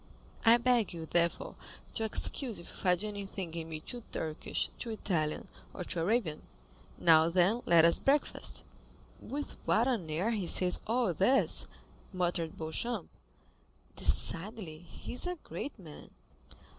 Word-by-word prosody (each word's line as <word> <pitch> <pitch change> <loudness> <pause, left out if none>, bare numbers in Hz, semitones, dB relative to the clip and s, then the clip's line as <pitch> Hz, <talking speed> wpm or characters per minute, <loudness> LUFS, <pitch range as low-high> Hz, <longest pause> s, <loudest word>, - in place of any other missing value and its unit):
I 230 0 +7
beg 240 -5 +2
you, 165 -1 -6
therefore, 170 +1 0 0.4
to 225 - -2
excuse 225 +2 0
if 170 - -6
you - - -12
find 180 0 +1
anything 200 -4 -5
in 165 -1 -5
me 155 -1 -5
too 240 +7 -6
Turkish, 155 -1 -2
too 235 - -4
Italian, 170 -8 -1 0.3
or 180 - -4
too 175 - -2
Arabian. 170 -3 0 0.6
Now, 160 -1 +6
then, 185 +7 +3
let 170 -1 +7
us 170 - +4
breakfast." 280 +2 0 0.6
"With 290 +1 -6
what 230 +3 +3
an 220 -11 -1
air 175 +9 0
he 205 -6 -1
says 180 0 +5
all 230 -4 +1
this," 245 - +3 0.5
muttered 175 -3 -1
Beauchamp; 175 +6 -2 0.9
"decidedly 180 -3 0
he 175 - -9
is 250 - +1
a 360 - -2
great 285 - -6
man." 160 -7 -11
185 Hz, 145 wpm, -32 LUFS, 165-230 Hz, 0.9 s, I